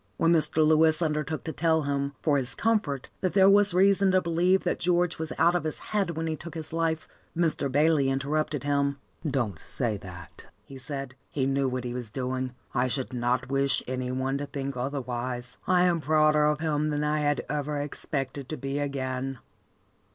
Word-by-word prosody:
When 165 Hz, +1 st, +3 dB
Mr. 155 Hz, -1 st, +4 dB
Lewis 155 Hz, 0 st, +4 dB
undertook 155 Hz, -2 st, -2 dB
to 160 Hz, -, -5 dB
tell 160 Hz, +1 st, +2 dB
him, 140 Hz, 0 st, -1 dB
for 145 Hz, -3 st, +3 dB
his 125 Hz, -1 st, -2 dB
comfort, 205 Hz, -, 0 dB
that 185 Hz, -, -1 dB
there 190 Hz, -1 st, +6 dB
was 200 Hz, -2 st, +6 dB
reason 195 Hz, +1 st, +4 dB
to 185 Hz, -, +5 dB
believe 175 Hz, +3 st, +2 dB
that 180 Hz, -, -1 dB
George 175 Hz, -1 st, +1 dB
was 160 Hz, -1 st, -4 dB
out 170 Hz, -, +4 dB
of 175 Hz, -, 0 dB
his 155 Hz, -1 st, +2 dB, 0.2 s
head 190 Hz, -6 st, 0 dB
when 165 Hz, -, -2 dB
he 160 Hz, -1 st, -1 dB
took 170 Hz, +2 st, -10 dB
his 160 Hz, -1 st, -6 dB
life, 165 Hz, -1 st, -1 dB, 0.3 s
Mr. 160 Hz, -5 st, +1 dB
Bayley 145 Hz, -1 st, +3 dB
interrupted 145 Hz, +2 st, -1 dB
him. 140 Hz, -1 st, 0 dB, 0.3 s
"Don't 120 Hz, -, -1 dB
say 115 Hz, +2 st, -2 dB
that," 90 Hz, -2 st, -12 dB, 0.2 s
he 135 Hz, -1 st, -11 dB
said. 135 Hz, 0 st, -5 dB, 0.2 s
"He 135 Hz, -3 st, -1 dB
knew 135 Hz, 0 st, +1 dB
what 130 Hz, -1 st, -3 dB
he 120 Hz, -1 st, -4 dB
was 125 Hz, -3 st, -5 dB
doing. 130 Hz, +1 st, -3 dB, 0.2 s
I 125 Hz, 0 st, +1 dB
should 130 Hz, 0 st, -2 dB
not 125 Hz, +1 st, -1 dB
wish 140 Hz, 0 st, +2 dB
any 130 Hz, 0 st, -3 dB
one 130 Hz, +2 st, -1 dB
to 145 Hz, -, -4 dB
think 140 Hz, -1 st, -4 dB
otherwise. 125 Hz, -1 st, -3 dB
I 180 Hz, -1 st, +4 dB
am 175 Hz, -2 st, +2 dB
prouder 155 Hz, -1 st, +3 dB
of 150 Hz, 0 st, +1 dB
him 155 Hz, -1 st, 0 dB
than 150 Hz, 0 st, -1 dB
I 150 Hz, +1 st, +1 dB
had 145 Hz, -1 st, 0 dB
ever 145 Hz, 0 st, -2 dB
expected 140 Hz, -2 st, -4 dB
to 155 Hz, -, -4 dB
be 140 Hz, +1 st, -3 dB
again." 135 Hz, -2 st, -3 dB
145 Hz, 195 wpm, -27 LUFS, 130-160 Hz, 0.3 s, there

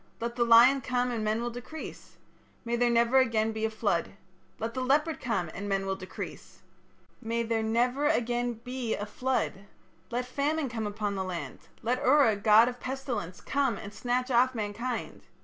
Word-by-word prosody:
Let 235 Hz, +1 st, -3 dB
the 240 Hz, -, +2 dB
lion 235 Hz, +4 st, +7 dB
come 250 Hz, -1 st, 0 dB
and 225 Hz, -2 st, -2 dB
men 215 Hz, +2 st, 0 dB
will 240 Hz, -, -2 dB
decrease. 245 Hz, +7 st, -9 dB, 0.5 s
May 235 Hz, 0 st, 0 dB
there 240 Hz, 0 st, +2 dB
never 235 Hz, +2 st, +4 dB
again 225 Hz, -3 st, +2 dB
be 220 Hz, 0 st, -2 dB
a -, -, 0 dB
flood. 205 Hz, -5 st, -1 dB, 0.4 s
Let 225 Hz, +1 st, -4 dB
the 255 Hz, -, -3 dB
leopard 300 Hz, +5 st, +1 dB
come 190 Hz, -10 st, -1 dB
and 205 Hz, +2 st, -5 dB
men 195 Hz, 0 st, 0 dB
will 195 Hz, 0 st, -1 dB
decrease. 185 Hz, -1 st, -9 dB, 0.6 s
May 230 Hz, +1 st, -1 dB
there 225 Hz, -1 st, 0 dB
never 245 Hz, +6 st, +1 dB
again 240 Hz, -4 st, +1 dB
be 250 Hz, -2 st, -2 dB
a 205 Hz, -, -4 dB
flood. 210 Hz, -3 st, -2 dB, 0.4 s
Let 245 Hz, +1 st, -2 dB
famine 285 Hz, +3 st, -1 dB
come 225 Hz, -2 st, -3 dB
upon 205 Hz, 0 st, -2 dB
the 190 Hz, -1 st, -2 dB
land; 180 Hz, -2 st, -5 dB, 0.2 s
let 250 Hz, +2 st, 0 dB
Ura, 265 Hz, -5 st, +5 dB
god 215 Hz, +3 st, +6 dB
of 245 Hz, 0 st, -4 dB
pestilence, 245 Hz, -10 st, -4 dB
come 275 Hz, -6 st, 0 dB
and 205 Hz, 0 st, -8 dB
snatch 250 Hz, +3 st, -1 dB
off 255 Hz, +1 st, +3 dB
mankind.... 225 Hz, +3 st, -4 dB
235 Hz, 180 wpm, -29 LUFS, 215-255 Hz, 0.6 s, lion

